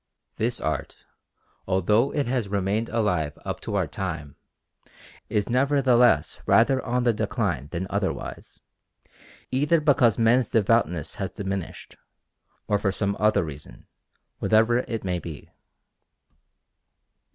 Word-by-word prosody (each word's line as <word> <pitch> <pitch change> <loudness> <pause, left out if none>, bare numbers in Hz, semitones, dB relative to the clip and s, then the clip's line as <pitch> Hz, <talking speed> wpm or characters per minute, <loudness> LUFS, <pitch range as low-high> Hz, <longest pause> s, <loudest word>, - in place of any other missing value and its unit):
This 120 +2 -1
art, 80 -4 -4 0.6
although 105 +7 +2
it 145 - -1
has 120 -3 -1
remained 100 +3 -1
alive 90 -10 0
up - - -4
to - - -4
our - - +2
own - - -7
time, 70 -2 -5 0.9
is 105 -1 0
nevertheless 125 - +3
rather 120 +6 +4
on 125 +1 0
the 120 -1 +3
decline 100 - -2
than 85 +4 -4
otherwise, 100 -1 -4 0.9
either 145 +5 +2
because 135 -7 +3
men's 115 +2 +3
devoutness 100 -7 +1
has - - -1
diminished, 95 -3 -6 0.7
or 105 -1 +1
for 100 -1 0
some 100 +1 -1
other 105 -3 +3
reason, 75 -2 -10 0.5
whatever 115 +2 +3
it 115 -2 -4
may 90 -2 -1
be. 80 -4 -9
110 Hz, 120 wpm, -25 LUFS, 95-120 Hz, 0.9 s, rather